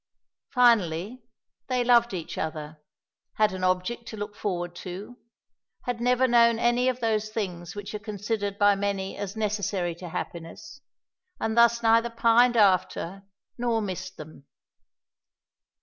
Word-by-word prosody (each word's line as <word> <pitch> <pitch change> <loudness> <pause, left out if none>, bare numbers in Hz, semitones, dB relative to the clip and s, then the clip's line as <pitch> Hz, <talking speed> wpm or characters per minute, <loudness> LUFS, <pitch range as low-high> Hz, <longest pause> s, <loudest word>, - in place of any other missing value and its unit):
Finally, 230 - +2 0.5
they 250 -1 +1
loved 240 -1 +4
each 175 -4 -5
other, 155 -1 -5 0.5
had 215 -2 +2
an 185 0 -5
object 185 +6 -1
to 220 - -7
look 205 0 -6
forward 175 -5 -3
to, 190 +8 -8 0.6
had 245 -2 -3
never 250 +1 +3
known 235 -1 +5
any 240 +2 +2
of 255 -1 -3
those 215 -2 0
things 180 -6 -5
which 205 0 -7
are 210 - -4
considered 205 -1 -3
by 205 0 +5
many 195 -1 -2
as 200 0 -5
necessary 200 -5 -1
to 175 +1 -9
happiness, 165 - -7 0.6
and 220 0 -1
thus 235 0 +4
neither 230 +1 +4
pined 235 +1 +4
after 195 -2 +2 0.4
nor 235 -2 +1
missed 190 -2 -5
them. 155 -2 -12
210 Hz, 135 wpm, -26 LUFS, 185-235 Hz, 0.6 s, known